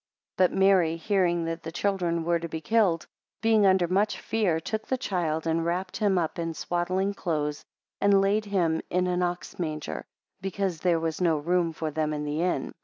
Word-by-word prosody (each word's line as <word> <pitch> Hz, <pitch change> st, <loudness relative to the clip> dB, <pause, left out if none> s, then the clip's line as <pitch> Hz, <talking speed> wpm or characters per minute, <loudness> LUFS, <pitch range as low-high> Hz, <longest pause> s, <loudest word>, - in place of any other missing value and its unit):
2 185 Hz, -, +7 dB
But -, -, -15 dB
Mary 190 Hz, -4 st, +4 dB
hearing 175 Hz, -2 st, +1 dB
that 165 Hz, 0 st, -3 dB
the 160 Hz, -, -6 dB
children 175 Hz, -3 st, 0 dB
were 170 Hz, 0 st, +1 dB
to 170 Hz, 0 st, -5 dB
be 160 Hz, -, -4 dB
killed, 185 Hz, -1 st, +2 dB, 0.4 s
being 220 Hz, -3 st, +5 dB
under 185 Hz, -2 st, +4 dB
much 200 Hz, +4 st, +1 dB
fear, 200 Hz, -8 st, 0 dB
took 215 Hz, +7 st, -4 dB
the 260 Hz, -, 0 dB
child, 165 Hz, -8 st, -1 dB
and 165 Hz, 0 st, +1 dB
wrapped 180 Hz, +2 st, -2 dB
him 205 Hz, -3 st, +2 dB
up 170 Hz, +1 st, -1 dB
in 165 Hz, -1 st, -3 dB
swaddling 185 Hz, +4 st, -1 dB
clothes, 150 Hz, -6 st, -2 dB, 0.4 s
and 200 Hz, -1 st, +5 dB
laid 205 Hz, +2 st, +2 dB
him 175 Hz, -6 st, +1 dB
in 180 Hz, 0 st, +1 dB
an 180 Hz, 0 st, 0 dB
ox 175 Hz, -1 st, -3 dB
manger, 155 Hz, -, -3 dB, 0.4 s
because 195 Hz, -3 st, -2 dB
there 175 Hz, -1 st, +2 dB
was 160 Hz, +1 st, -3 dB
no 165 Hz, -3 st, +3 dB
room 170 Hz, +2 st, +1 dB
for 160 Hz, -1 st, -4 dB
them 155 Hz, 0 st, -1 dB
in 150 Hz, 0 st, -3 dB
the 150 Hz, +2 st, -2 dB
inn. 180 Hz, +1 st, -1 dB
175 Hz, 195 wpm, -27 LUFS, 160-195 Hz, 0.4 s, 2